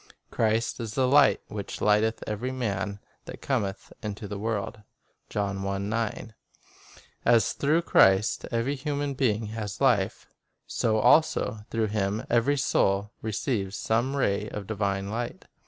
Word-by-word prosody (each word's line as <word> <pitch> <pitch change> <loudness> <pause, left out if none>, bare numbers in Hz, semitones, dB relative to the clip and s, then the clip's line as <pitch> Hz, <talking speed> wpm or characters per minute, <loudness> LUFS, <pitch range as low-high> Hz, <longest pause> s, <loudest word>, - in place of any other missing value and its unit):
Christ 115 +2 0
is 110 -2 -5
the 130 -1 +2
"Light, 140 +1 +5
which 100 -2 -6
lighteth 105 +2 +2
every 110 +5 -3
man 105 -5 -2 0.3
that - - -9
cometh 105 -8 -2
into 105 0 -5
the 100 0 -5
world." 105 -1 -3 0.5
1 100 +3 -2 0.9
As 115 -4 +4
through 155 +4 +1
Christ 95 - +4
every 120 +4 0
human 145 0 -2
being 115 -5 0
has 105 -2 -5
life, 115 -8 +2 0.4
so 110 -1 0
also 110 -4 +3
through 115 -1 0
Him 105 0 -1
every 120 +5 +3
soul 100 -6 +1
receives 105 -2 -2
some 120 +5 0
ray 105 -5 0
of 105 -1 -6
divine 100 -1 -2
light. 120 +2 -4
110 Hz, 130 wpm, -27 LUFS, 100-120 Hz, 0.9 s, Light